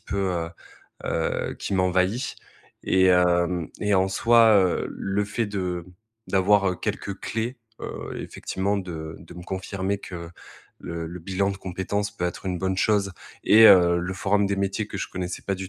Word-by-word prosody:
peu, -, -, -5 dB, 0.2 s
heu, 85 Hz, -1 st, -2 dB, 0.6 s
heu, -, -, -1 dB
qui 100 Hz, -, -3 dB
m'envahit. 95 Hz, +6 st, +1 dB, 0.5 s
Et 95 Hz, 0 st, +4 dB
heu 90 Hz, -1 st, +2 dB
et 105 Hz, -1 st, +2 dB
en 95 Hz, 0 st, +3 dB
soi, 115 Hz, +2 st, +5 dB
heu, 95 Hz, -3 st, +2 dB
le 100 Hz, +1 st, -2 dB
fait 105 Hz, +2 st, -2 dB
de 90 Hz, -4 st, -3 dB, 0.4 s
d'avoir 95 Hz, -1 st, +3 dB
quelques 100 Hz, -1 st, -3 dB
clés, 115 Hz, +3 st, -3 dB, 0.2 s
heu, -, -, -6 dB
effectivement 100 Hz, +2 st, -2 dB
de 80 Hz, -5 st, -6 dB
de -, -, -13 dB
me 90 Hz, -, -9 dB
confirmer 95 Hz, +1 st, -3 dB
que 85 Hz, -4 st, -8 dB, 0.5 s
le 85 Hz, -1 st, -5 dB
le 85 Hz, +2 st, -7 dB
bilan 100 Hz, +3 st, 0 dB
de 100 Hz, -, -5 dB
compétences 95 Hz, +2 st, -3 dB
peut 90 Hz, -3 st, -1 dB
être 90 Hz, -, -6 dB
une 90 Hz, -1 st, -1 dB
bonne 95 Hz, 0 st, -1 dB
chose 100 Hz, -1 st, +2 dB, 0.3 s
et 110 Hz, +2 st, +7 dB
heu, 85 Hz, -3 st, +7 dB
le 90 Hz, +2 st, -3 dB
forum 100 Hz, +1 st, +1 dB
des 100 Hz, 0 st, -1 dB
métiers 100 Hz, +2 st, -1 dB
que 100 Hz, -, -6 dB
je -, -, -3 dB
connaissais 90 Hz, -1 st, -4 dB
pas 100 Hz, -, -1 dB
du 95 Hz, 0 st, -6 dB
95 Hz, 170 wpm, -25 LUFS, 90-100 Hz, 0.6 s, et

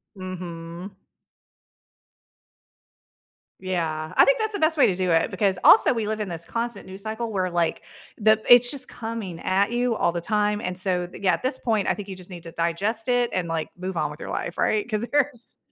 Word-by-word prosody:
Mhm. 180 Hz, 0 st, -8 dB, 2.6 s
Yeah, 160 Hz, -4 st, -3 dB
I -, -, +8 dB
think -, -, +3 dB
that's 435 Hz, -1 st, -1 dB
the 405 Hz, -, -3 dB
best 315 Hz, 0 st, +2 dB
way -, -, +6 dB
to 190 Hz, -, +1 dB
do 185 Hz, -1 st, -1 dB
it 165 Hz, 0 st, +2 dB
because 195 Hz, -4 st, +1 dB
also, 225 Hz, -, +7 dB
we 225 Hz, -3 st, -2 dB
live 215 Hz, 0 st, -2 dB
in 205 Hz, -, -2 dB
this 170 Hz, -1 st, -2 dB
constant 235 Hz, +4 st, -4 dB
news 190 Hz, +1 st, -8 dB
cycle 220 Hz, +1 st, -4 dB
where, 185 Hz, -2 st, -1 dB
like, 170 Hz, -1 st, 0 dB, 0.4 s
the 215 Hz, 0 st, +4 dB
it's 245 Hz, 0 st, +7 dB
just 265 Hz, -3 st, -2 dB
coming 225 Hz, -7 st, -6 dB
at 200 Hz, +4 st, +1 dB
you 240 Hz, -1 st, 0 dB
all 170 Hz, -, +1 dB
the 170 Hz, -, -3 dB
time, 210 Hz, +2 st, 0 dB
and 180 Hz, 0 st, -4 dB
so, 180 Hz, -2 st, 0 dB
the 180 Hz, -, -12 dB
yeah, 190 Hz, -2 st, +3 dB
at -, -, -5 dB
this 260 Hz, 0 st, -1 dB
point, 220 Hz, -4 st, 0 dB
I -, -, +3 dB
think 205 Hz, -1 st, -7 dB
you 190 Hz, -, -5 dB
just 185 Hz, +1 st, -11 dB
need 175 Hz, -2 st, -9 dB
to 165 Hz, -, -9 dB
digest 200 Hz, +8 st, 0 dB
it 245 Hz, -1 st, +2 dB
and, 180 Hz, -2 st, -2 dB
like, 165 Hz, -1 st, -3 dB
move 185 Hz, 0 st, -5 dB
on 150 Hz, -2 st, 0 dB
with 150 Hz, -, -13 dB
your -, -, -6 dB
life, 170 Hz, -, -4 dB
right? 215 Hz, +2 st, +1 dB
‘Cause 215 Hz, +1 st, -2 dB
there's 285 Hz, -4 st, -1 dB
195 Hz, 215 wpm, -24 LUFS, 175-230 Hz, 2.6 s, I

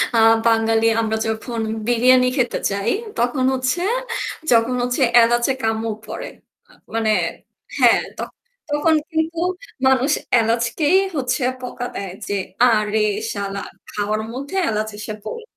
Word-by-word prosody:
আ -, -, +4 dB, 0.3 s
বাঙালি 225 Hz, 0 st, +3 dB, 0.2 s
আমরা 220 Hz, 0 st, -1 dB
যখন 225 Hz, +1 st, -3 dB, 0.3 s
বিরিয়ানি 250 Hz, +1 st, +4 dB
খেতে 245 Hz, -3 st, +1 dB
যাই 200 Hz, +3 st, 0 dB, 0.3 s
তখন 245 Hz, +2 st, +1 dB
হচ্ছে 255 Hz, +6 st, -1 dB, 0.7 s
যখন 230 Hz, +1 st, +4 dB
হচ্ছে 250 Hz, +3 st, -1 dB, 0.2 s
এলাচে 240 Hz, +3 st, +2 dB
কামড় 225 Hz, 0 st, -1 dB
পড়ে। -, -, -6 dB, 0.4 s
আ -, -, -20 dB, 0.2 s
মানে 225 Hz, -1 st, 0 dB, 0.7 s
হ্যাঁ, -, -, +6 dB, 0.2 s
তখ -, -, -5 dB, 0.4 s
তখন 295 Hz, +2 st, +2 dB, 0.2 s
কিন্তু 320 Hz, +1 st, -1 dB, 0.5 s
মানুষ 265 Hz, +2 st, +3 dB, 0.3 s
এলাচকেই 235 Hz, +9 st, +2 dB, 0.2 s
হচ্ছে 255 Hz, -1 st, -1 dB, 0.2 s
বকা 245 Hz, -1 st, -5 dB
দেয় 195 Hz, -2 st, -5 dB
যে -, -, -2 dB, 0.3 s
"আরে 220 Hz, -3 st, +3 dB, 0.3 s
শালা 200 Hz, -1 st, -4 dB, 0.3 s
খাওয়ার 210 Hz, +1 st, -2 dB
মধ্যে 280 Hz, +8 st, -6 dB
এলাচ 215 Hz, 0 st, -1 dB
এসে 215 Hz, 0 st, -5 dB
পড়ে।" 470 Hz, -1 st, -6 dB
235 Hz, 125 wpm, -20 LUFS, 220-255 Hz, 0.7 s, হ্যাঁ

